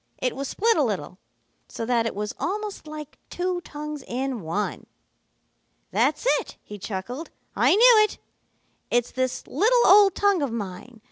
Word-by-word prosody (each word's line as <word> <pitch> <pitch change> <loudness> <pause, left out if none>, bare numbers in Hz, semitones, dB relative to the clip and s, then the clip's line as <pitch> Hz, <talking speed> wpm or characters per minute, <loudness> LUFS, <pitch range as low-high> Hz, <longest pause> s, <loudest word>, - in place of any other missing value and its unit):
It 250 - -2
was 275 +1 -4
split 455 - +2
a - - +4
little, - - -3 0.5
so 225 - -5
that 230 -1 +1
it - - -4
was 210 +1 -3
almost 415 -2 -4
like 300 -1 -9
two 360 0 -2
tongues 300 -3 -7
in 255 -1 -3
one. 175 +6 -3 1.0
"'That's - - +1
it,' - - -10
he 210 0 -10
chuckled. 230 - -5 0.3
'I - - +4
knew 460 0 +7
it. - - -7 0.7
It's 240 0 +1
this 255 -1 -2
little 480 +4 +3
old 400 -1 +7
tongue 405 -4 +2
of 280 -4 -1
mine. 220 +2 -7
275 Hz, 155 wpm, -25 LUFS, 230-390 Hz, 1.0 s, knew